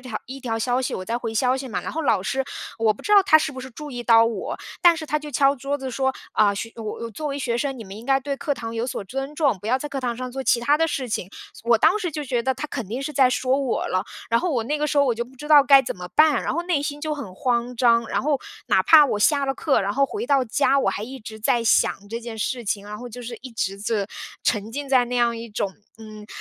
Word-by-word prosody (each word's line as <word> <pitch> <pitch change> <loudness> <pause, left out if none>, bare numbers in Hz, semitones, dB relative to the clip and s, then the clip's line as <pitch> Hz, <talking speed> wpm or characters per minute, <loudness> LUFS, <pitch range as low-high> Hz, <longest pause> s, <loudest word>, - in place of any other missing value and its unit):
条 250 -4 -5
一 270 +2 -8
条 230 -3 -2
消 245 +3 0
息， 255 - -2
我 185 - -5
在 235 +3 -2
回 225 -2 -5
消 250 +3 +2
息 265 -1 -6
嘛。 - - -3
然 - - -5
后 320 - -2
老 215 -9 +2
师 265 +8 -1 0.4
我 220 -1 +3
不 - - -15
知 420 - -1
道 400 -1 +8
他 315 -5 +6
是 310 -2 0
不 260 - -7
是 260 - -8
注 295 +4 -9
意 245 -2 -5
到 230 -1 +6
我， 230 -4 -3 0.2
但 345 -1 +6
是 320 - -5
他 300 0 -1
就 300 0 -9
敲 275 +1 +3
桌 275 +2 -3
子 265 -2 -5
说： 265 +2 0 0.2
“啊， 205 -1 +3
学 225 +3 -5
呃， 230 - -7
我 230 +2 -5
作 300 +8 -5
为 280 -1 -3
学 240 -4 -1
生， 270 0 -2
你 225 - -8
们 195 - -10
应 225 +4 -11
该 270 0 +4
对 280 +1 -3
课 285 0 -2
堂 230 -2 -6
有 230 +2 -2
所 250 - -4
尊 270 +6 -5
重， 285 - +1
不 205 - -9
要 255 +3 +2
在 295 - -5
课 275 - -4
堂 240 -2 -2
上 255 0 -5
做 265 +1 -4
其 235 - +2
它 290 +5 +3
的 325 - +3
事 270 -4 -3
情。 185 - -2 0.2
“这 235 - -13
我 235 - +6
当 420 - +4
时 355 -5 -2
就 300 0 -5
觉 245 -2 -1
得 265 +1 0
他 300 +4 -5
肯 240 -7 -4
定 245 +6 -4
是 300 +2 -4
在 265 -3 +5
说 255 +1 +1
我 265 -3 -1
了。 185 +2 0 0.3
然 230 - +4
后 360 - -1
我 240 -4 0
那 295 +5 -1
个 300 - 0
时 295 - -2
候 285 - +5
我 250 - +2
就 235 +1 -3
不 255 +2 -18
知 295 +4 -9
道 290 -2 +8
该 275 -1 +7
怎 240 - -5
么 180 0 -7
办， 310 -1 +5
然 - - -1
后 340 - -1
内 345 -5 0
心 290 0 -4
就 310 0 -2
很 220 -11 -8
慌 245 -1 -1
张。 235 -1 +3
然 - - -1
后 290 -1 +1 0.3
哪 - - +3
怕 310 -2 +8
我 210 -7 -1
下 280 +6 +3
了 270 - 0
课， 280 -5 +1
然 200 +1 -1
后 275 +3 +2
回 - - -4
到 275 -1 +3
家， 275 +3 +2
我 265 - +1
还 200 - -4
一 260 +4 -7
直 220 -1 -10
在 235 +2 +1
想 205 -2 +2
这 230 +2 -4
件 230 -1 -7
事 240 +2 -2
情。 200 -1 -2
然 210 - -6
后 245 - -8
就 245 +1 -9
是 235 0 -6
一 260 - -9
直 200 -4 -3
是 210 -2 -1 0.4
沉 210 -1 0
浸 280 +4 -5
在 255 -2 +4
那 245 +1 -3
样 235 -1 +2
一 230 0 -7
种， 200 -2 -3 0.2
嗯， 215 -1 -11
250 Hz, 325 characters per minute, -23 LUFS, 225-280 Hz, 0.4 s, 道